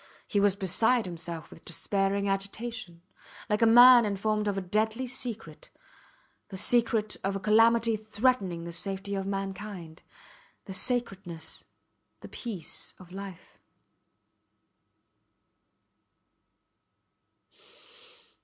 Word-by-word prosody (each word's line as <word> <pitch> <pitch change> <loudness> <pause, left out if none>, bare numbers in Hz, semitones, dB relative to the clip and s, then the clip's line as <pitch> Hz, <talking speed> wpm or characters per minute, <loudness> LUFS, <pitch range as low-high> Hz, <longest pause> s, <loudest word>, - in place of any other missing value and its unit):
He 205 - +1
was 200 -1 +3
beside 220 +5 +2
himself 170 -2 -7
with - - -13
a - - -37
despairing 195 +3 -1
agitation, 195 -2 -4 0.5
like 210 - +1
a 230 - +6
man 240 +1 +9
informed 210 +1 -1
of 200 -1 -1
a - - +1
deadly 215 +6 -1
secret 245 - -5 0.8
the 195 - -8
secret 225 0 +1
of 195 +1 -1
a - - -2
calamity 225 +2 +4
threatening 210 -5 0
the 170 0 -7
safety 195 +3 -4
of 195 -1 -3
mankind 195 -4 -6 0.6
the 195 - -7
sacredness, 190 -7 -1 0.6
the - - -10
peace 205 -10 -4
of 180 -2 -15
life. 195 -2 -10
200 Hz, 105 wpm, -28 LUFS, 190-225 Hz, 0.8 s, man